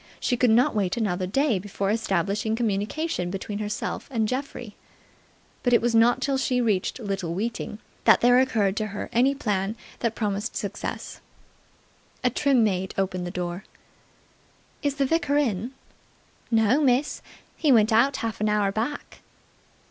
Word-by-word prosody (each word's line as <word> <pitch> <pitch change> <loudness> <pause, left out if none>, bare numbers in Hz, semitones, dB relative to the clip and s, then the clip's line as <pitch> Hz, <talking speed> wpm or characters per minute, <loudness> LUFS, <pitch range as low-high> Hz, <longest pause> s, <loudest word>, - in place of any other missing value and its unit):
She 250 - 0
could 245 0 +3
not 235 +3 +4
wait 200 0 0
another 185 -5 -1
day 255 0 +1
before 200 +1 -2
establishing 205 0 0
communication 215 - -1
between 200 +2 -5
herself 210 0 -4
and 225 -5 0
Geoffrey. 250 -3 -5 0.9
But 245 - +1
it 235 - +7
was 235 0 0
not 230 +2 +4
till 275 -1 0
she 255 -1 +1
reached 215 -2 0
Little 195 -6 -3
Weeting 220 +1 -3 0.3
that - - +6
there 245 +1 +6
occurred 215 -7 +1
to 215 - -1
her 205 0 -6
any 260 +4 +3
plan 205 -5 -1 0.2
that 230 -2 -1
promised 210 +1 -2
success. 205 -2 -5 1.0
A 250 - +3
trim 265 -2 +3
maid 190 -3 -1
opened 185 -2 -1
the - - -3
door. 175 +1 -4 1.2
"Is 285 -1 -1
the 280 -2 +1
vicar 290 -1 +1
in?" 230 -6 0 0.8
"No, 225 +5 +3
miss. 270 +1 +1 0.3
He 300 - +2
went 220 -2 +5
out 260 +5 +4
half 225 -2 -4
an 215 - +2
hour 210 -2 +2
back." 235 +8 -4
220 Hz, 155 wpm, -25 LUFS, 200-250 Hz, 1.2 s, it